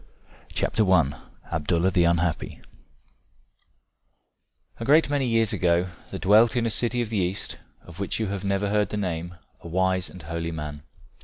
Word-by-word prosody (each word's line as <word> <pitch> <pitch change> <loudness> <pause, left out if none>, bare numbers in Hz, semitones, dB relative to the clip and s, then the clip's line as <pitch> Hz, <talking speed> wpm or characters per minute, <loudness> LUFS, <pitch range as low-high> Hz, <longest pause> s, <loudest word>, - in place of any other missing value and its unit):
ABDALLAH 85 -1 0
THE 90 -2 +3
UNHAPPY. 85 -1 0 2.2
A - - -4
great 145 +2 +4
many 140 -3 +1
years 115 -2 +2
ago 90 +1 +2 0.2
there - - -5
dwelt 110 +5 +5
in 120 -1 +1
a 115 - 0
city 120 +2 +1
of 115 -2 -4
the 105 - 0
East, 90 +2 -3 0.2
of 85 +1 -13
which 100 - -2
you 110 - 0
have 100 -2 -4
never 100 0 0
heard 105 -2 +2
the 105 - -3
name, 85 -3 -3 0.2
a - - -10
wise 95 +1 0
and 90 - -12
holy 85 +1 -4
man. 75 -2 -6
95 Hz, 155 wpm, -25 LUFS, 85-110 Hz, 2.2 s, dwelt